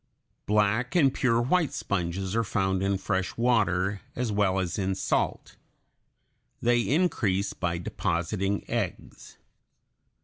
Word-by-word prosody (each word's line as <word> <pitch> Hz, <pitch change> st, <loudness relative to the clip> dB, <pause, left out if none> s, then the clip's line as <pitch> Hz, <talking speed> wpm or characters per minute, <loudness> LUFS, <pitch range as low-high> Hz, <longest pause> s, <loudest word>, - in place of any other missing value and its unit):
Black 105 Hz, -, +1 dB
and 140 Hz, -7 st, +4 dB
pure 115 Hz, -3 st, +2 dB
white 150 Hz, +6 st, +1 dB
sponges 95 Hz, +1 st, -2 dB
are 115 Hz, -, +2 dB
found 95 Hz, -2 st, 0 dB
in 95 Hz, 0 st, +1 dB
fresh 95 Hz, -1 st, -2 dB
water 100 Hz, -5 st, +1 dB
as 120 Hz, -2 st, -1 dB
well 100 Hz, -2 st, +2 dB
as 95 Hz, +1 st, -2 dB
in 95 Hz, -1 st, 0 dB
salt. 95 Hz, -, -1 dB, 1.0 s
They 120 Hz, 0 st, +3 dB
increase 110 Hz, -, +1 dB
by 85 Hz, -1 st, -2 dB
depositing 95 Hz, +3 st, -2 dB
eggs. -, -, -5 dB
100 Hz, 115 wpm, -27 LUFS, 95-115 Hz, 1.0 s, and